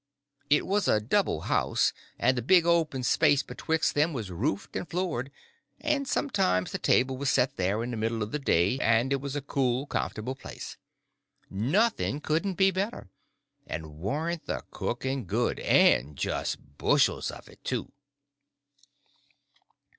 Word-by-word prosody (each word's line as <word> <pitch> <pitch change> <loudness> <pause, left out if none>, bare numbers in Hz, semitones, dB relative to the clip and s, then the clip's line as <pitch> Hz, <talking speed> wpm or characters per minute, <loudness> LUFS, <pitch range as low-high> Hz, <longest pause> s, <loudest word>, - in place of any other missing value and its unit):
It 150 - +4
was 200 +2 +1
a 105 - +4
double 180 - 0
house, - - +1 0.2
and 130 +2 +2
the 125 - -1
big 170 +7 +5
open 160 -6 +2
place 145 +2 +3
betwixt 160 0 -1
them 150 +3 +2
was 110 -8 -5
roofed 130 - -2
and 170 - -4
floored, 165 -8 -2 0.5
and 295 -3 0
sometimes 95 - +1
the - - -3
table 130 +1 +2
was 140 0 -1
set 135 -2 +2
there 100 +5 0
in 120 - -4
the 115 - -4
middle 110 0 -1
of 105 - -6
the 150 - -2
day, 100 - +2
and 115 +4 +2
it - - +2
was 140 0 -5
a 145 - -3
cool, 130 -1 0
comfortable 125 -3 -3
place. 135 - -9 0.8
Nothing 145 - +1
couldn't 165 +5 -1
be 195 +2 +4
better. 195 +5 -3 0.6
And 80 -1 -6
warn't 155 - -2
the - - -3
cooking 130 -1 -3
good, - - 0
and 70 +4 +4
just - - -2 0.2
bushels - - +2
of - - -9
it - - -18
too! - - -3
135 Hz, 155 wpm, -28 LUFS, 115-170 Hz, 0.8 s, big